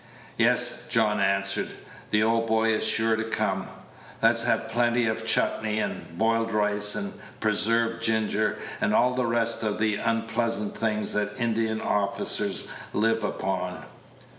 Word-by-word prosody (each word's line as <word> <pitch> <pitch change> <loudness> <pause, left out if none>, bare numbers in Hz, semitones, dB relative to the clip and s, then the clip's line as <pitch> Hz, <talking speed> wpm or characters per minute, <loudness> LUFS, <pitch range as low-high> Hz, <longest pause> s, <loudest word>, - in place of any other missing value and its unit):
"Yes," - - +2
John 105 0 +2
answered, 100 0 0 0.3
"the 105 0 +2
old 115 +1 +1
boy 110 0 +2
is 110 - 0
sure 110 0 +3
to 110 - -2
come. 115 - -2 0.5
Let's 115 +1 +4
have 115 -1 +1
plenty 120 +1 +1
of 110 0 -2
chutnee, 110 -1 +1
and 85 - -5
boiled 115 +1 +1
rice, 105 0 +2
and 200 0 -4 0.3
preserved 115 +2 +2
ginger, 110 -1 0 0.2
and - - +1
all 125 +1 +3
the 125 -1 -1
rest 115 0 0
of 105 -2 -1
the 110 -1 +1
unpleasant 115 -1 -1
things 105 -1 -1
that 105 +1 -2
Indian 115 -2 0
officers 100 -1 0 0.3
live 115 +1 +1
upon. 90 -3 -3
110 Hz, 140 wpm, -26 LUFS, 105-115 Hz, 0.5 s, Let's